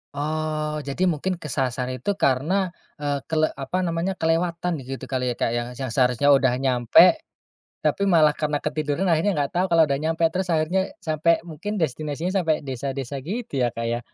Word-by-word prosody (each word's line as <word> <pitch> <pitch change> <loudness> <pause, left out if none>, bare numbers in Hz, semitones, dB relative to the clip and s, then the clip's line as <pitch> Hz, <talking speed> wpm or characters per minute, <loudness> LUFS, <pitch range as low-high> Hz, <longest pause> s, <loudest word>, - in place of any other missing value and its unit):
Oh, 155 +1 -2
jadi 180 +7 0
mungkin 175 +2 -1
kesasar 130 -4 -2
itu 130 - -5
karena, 160 +9 +2 0.3
eee, 145 -2 -2
kele 155 0 +3 0.2
apa 135 +7 -2
namanya, 170 +1 -1
kelewatan 170 +2 0
gitu 135 +1 -7
kali 125 -2 -1
ya - - -4
Kak, 115 - +1
yang 120 0 -2
yang 130 - -2
seharusnya 125 +1 +2
udah 135 -2 +3
nyampe, 125 -3 +5 0.7
tapi 150 +6 +1
malah 155 -4 +5
karena 150 -1 -1
ketiduran 150 +4 -2
akhirnya 165 +3 +2
enggak 140 -1 -1
tahu 180 +2 +2
kalau 165 -1 +6
udah 140 - 0
nyampe, 165 +1 +1
terus 185 0 -1
akhirnya 170 +4 +1
sampai 160 +1 +1
mungkin 185 +6 -5
destinasinya 155 +3 -2
sampai 155 -3 0
desa-desa 135 0 -4
gitu 185 - -3
ya 120 - +3
Kak 115 +1 -4
ya. 120 +1 -1
155 Hz, 175 wpm, -24 LUFS, 135-170 Hz, 0.7 s, kalau